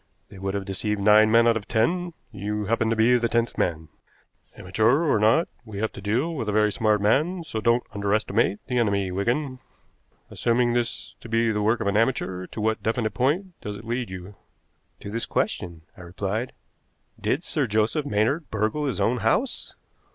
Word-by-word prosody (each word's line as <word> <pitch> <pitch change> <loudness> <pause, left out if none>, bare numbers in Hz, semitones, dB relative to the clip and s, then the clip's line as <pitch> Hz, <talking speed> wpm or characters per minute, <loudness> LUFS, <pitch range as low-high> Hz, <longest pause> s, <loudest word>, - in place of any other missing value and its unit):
They 95 - -12
would 95 +1 -3
have 100 -1 -3
deceived 105 +2 -2
nine 105 +2 +6
men 115 +1 +5
out 115 - +4
of 105 -2 -4
ten 170 +10 0 0.2
you 105 0 -3
happen 115 +1 +1
to 115 - +1
be 120 +3 +4
the 115 0 0
tenth 115 0 0
man. 80 -2 -1 0.7
Amateur 110 - +2
or 145 -9 +2
not, 115 +11 +4 0.2
we 110 -4 -9
have 110 +2 -1
to - - -10
deal 120 - 0
with 120 -9 -3
a - - +1
very 105 0 +3
smart 105 0 +2
man, 155 - +2
so 110 -8 -4
don't 115 +2 +3
underestimate 100 +1 0
the 125 -1 0
enemy, 100 -4 +1
Wigan. 125 +8 -1 0.7
Assuming 120 0 +1
this 120 -1 -2
to 115 - -10
be 115 0 +2
the 105 -1 -1
work 110 +3 +2
of - - -2
an 100 +1 +2
amateur, 95 -6 0
to - - -8
what 110 +1 0
definite 110 -1 -1
point 150 - 0
does 105 0 -5
it 110 - -12
lead 120 0 -2
you?" 95 +2 -8 0.7
"To 100 - -7
this 115 +2 -3
question," 85 -2 -2
I - - -13
replied. 100 +7 -3 0.7
"Did 145 +7 -1
Sir 150 -7 0
Joseph 110 +8 +1
Maynard 135 +6 0
burgle 110 +8 -1
his 135 - -2
own 125 +2 +2
house?" 120 - -1
110 Hz, 190 wpm, -25 LUFS, 105-125 Hz, 0.7 s, nine